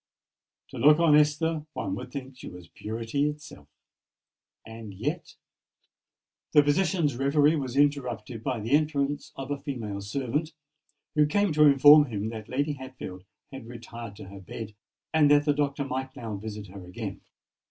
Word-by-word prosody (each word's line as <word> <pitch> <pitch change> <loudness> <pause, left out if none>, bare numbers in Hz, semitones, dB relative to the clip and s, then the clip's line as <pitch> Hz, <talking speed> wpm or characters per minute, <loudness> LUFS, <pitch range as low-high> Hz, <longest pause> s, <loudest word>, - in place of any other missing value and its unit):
To - - -9
look 150 +1 +7
on 165 -3 +5
Esther, 150 +1 +2
one 95 - -3
would 125 +6 -6
think 135 -1 -7
she - - -9
was 90 -1 -12
purity 115 +7 -2
itself? 150 0 -10 1.0
And 110 -3 -9
yet——" - - -4 1.2
The 150 - +7
physician's 155 -2 +1
reverie 145 +3 +3
was 135 -3 -3
interrupted 125 -6 0
by 125 -4 -2
the 115 +4 -5
entrance 145 0 +1
of 135 +1 -6
a 145 - -2
female 115 -9 -5
servant, 140 +9 -2 0.6
who 150 -1 +4
came 205 +2 +1
to 150 0 +6
inform 145 +2 +8
him 110 -4 -3
that 110 -2 -8
Lady 145 +3 0
Hatfield 130 -9 -9 0.3
had 135 -4 -9
retired 115 -2 -9
to 95 - -11
her 100 0 -10
bed, 105 +3 -8 0.4
and 155 -2 +5
that 145 0 +5
the 145 - +3
Doctor 140 -1 -1
might 130 0 -4
now 110 -3 -5
visit 105 0 -7
her 95 0 -10
again. 90 0 -7
135 Hz, 160 wpm, -27 LUFS, 115-150 Hz, 1.2 s, inform